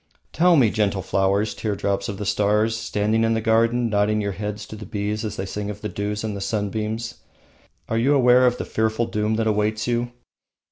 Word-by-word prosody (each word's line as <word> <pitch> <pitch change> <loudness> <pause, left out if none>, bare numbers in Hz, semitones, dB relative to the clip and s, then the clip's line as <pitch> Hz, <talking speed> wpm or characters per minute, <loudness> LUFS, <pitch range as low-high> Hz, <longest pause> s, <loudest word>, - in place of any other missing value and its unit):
Tell 175 +1 +4
me, 120 -8 +4
gentle 100 -3 0
flowers, 100 +2 +1
teardrops 100 0 -2
of 100 - -5
the 105 - -5
stars, 105 +2 +2
standing 110 0 0
in 115 0 +2
the - - +1
garden, 115 +2 +2
nodding 105 0 +1
your 100 -1 -1
heads 105 +1 -5
to - - -9
the 105 -2 -9
bees 105 +1 -3
as 110 - -4
they 95 - -4
sing 105 +1 -4
of 105 0 -7
the 105 - -4
dews 105 +2 -3
and 110 -2 -3
the 100 - -5
sunbeams, 110 +3 -3 0.7
are 115 - 0
you 140 +5 +3
aware 125 -1 +5
of 125 0 +1
the - - -4
fearful 110 +1 0
doom 105 0 -1
that 115 0 0
awaits 110 0 0
you? 120 0 -1
110 Hz, 205 wpm, -23 LUFS, 105-115 Hz, 0.7 s, aware